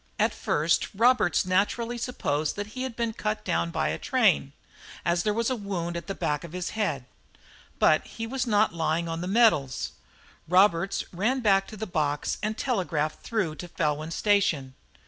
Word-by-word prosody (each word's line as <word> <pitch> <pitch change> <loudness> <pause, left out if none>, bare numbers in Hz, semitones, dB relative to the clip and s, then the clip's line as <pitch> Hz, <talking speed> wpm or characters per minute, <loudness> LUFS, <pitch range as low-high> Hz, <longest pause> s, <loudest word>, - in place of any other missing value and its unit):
At - - +2
first 155 +3 +1
Roberts 225 - +3
naturally 230 +6 0
supposed 155 - -1
that 205 - -3
he 255 - -5
had 260 -3 -4
been 230 -1 -1
cut 215 0 -3
down 170 -2 0
by 170 - -1
a - - -3
train, 220 - +2 0.5
as 170 0 +2
there 210 - +1
was 230 +4 0
a - - +1
wound 185 -6 -4
at 170 - -5
the 195 - -3
back 150 -1 -1
of 170 - -9
the 180 - -4
head; 215 -2 -1 0.7
but - - +4
he 225 - -6
was 250 +1 -2
not 210 -3 +3
lying 165 0 0
on 165 0 -3
the 180 - -3
metals. 195 - +2 0.6
Roberts 185 +1 +3
ran 235 +9 0
back 195 -3 +3
to 215 - -10
the 220 - -3
box 150 -6 -1
and 215 +1 -2
telegraphed 170 - -1
through 210 -9 -1
to 175 - -7
Felwyn 155 -2 -1
Station. 170 -10 +1
195 Hz, 180 wpm, -27 LUFS, 165-225 Hz, 0.7 s, but